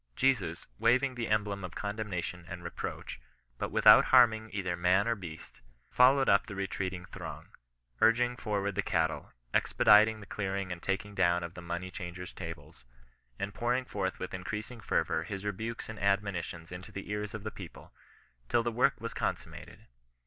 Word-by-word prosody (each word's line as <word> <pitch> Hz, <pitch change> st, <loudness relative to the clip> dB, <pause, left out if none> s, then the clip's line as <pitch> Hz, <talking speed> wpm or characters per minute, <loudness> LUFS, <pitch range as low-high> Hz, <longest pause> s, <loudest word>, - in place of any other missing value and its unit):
Jesus, 100 Hz, -12 st, +1 dB
waving 130 Hz, +3 st, +3 dB
the 120 Hz, -2 st, -3 dB
em 105 Hz, -1 st, +2 dB
blem 100 Hz, -1 st, -5 dB
of 90 Hz, -2 st, -7 dB
condemnation 100 Hz, -4 st, -4 dB
and 90 Hz, -2 st, -7 dB
reproach, 85 Hz, -, -6 dB, 0.4 s
but -, -, -2 dB
without -, -, +7 dB
harm 125 Hz, -3 st, +7 dB
ing 110 Hz, 0 st, -7 dB
either 95 Hz, -3 st, -2 dB
man 90 Hz, +4 st, +3 dB
or 115 Hz, -, +3 dB
beast, 85 Hz, -, -10 dB, 0.3 s
followed 135 Hz, +2 st, +5 dB
up 100 Hz, +2 st, +4 dB
the 100 Hz, -, -7 dB
retreating 95 Hz, -2 st, -3 dB
throng, -, -, -8 dB, 0.5 s
urging 120 Hz, +2 st, +4 dB
forward 100 Hz, -4 st, -2 dB
the 105 Hz, -, 0 dB
cattle, 80 Hz, -4 st, -1 dB, 0.2 s
expediting 110 Hz, +1 st, +5 dB
the 105 Hz, -, -10 dB
clearing 100 Hz, -2 st, -3 dB
and 85 Hz, -1 st, -5 dB
taking 105 Hz, +2 st, -2 dB
down 85 Hz, -2 st, +2 dB
of 85 Hz, 0 st, -6 dB
the 90 Hz, -, -9 dB
money 85 Hz, +2 st, -4 dB
changers' 90 Hz, 0 st, -7 dB
tables, 65 Hz, -, -9 dB, 0.5 s
and 100 Hz, 0 st, -4 dB
pouring 125 Hz, +2 st, 0 dB
forth 95 Hz, -5 st, -2 dB
with 95 Hz, -, -6 dB
increasing 105 Hz, +5 st, -5 dB
fervour 80 Hz, -, 0 dB
his 95 Hz, +4 st, -6 dB
rebukes 110 Hz, +3 st, -4 dB
and 110 Hz, -2 st, -7 dB
admonitions 100 Hz, -4 st, -1 dB
into 90 Hz, +3 st, -8 dB
the 100 Hz, 0 st, -7 dB
ears 105 Hz, 0 st, -3 dB
of 105 Hz, -, -7 dB
the 110 Hz, -, -4 dB
people, 95 Hz, -4 st, -11 dB, 0.6 s
till 120 Hz, -, +3 dB
the 120 Hz, -, -1 dB
work 130 Hz, +4 st, +2 dB
was 115 Hz, +1 st, -5 dB
consum -, -, -2 dB
mated. -, -, -12 dB
100 Hz, 175 wpm, -31 LUFS, 90-110 Hz, 0.6 s, without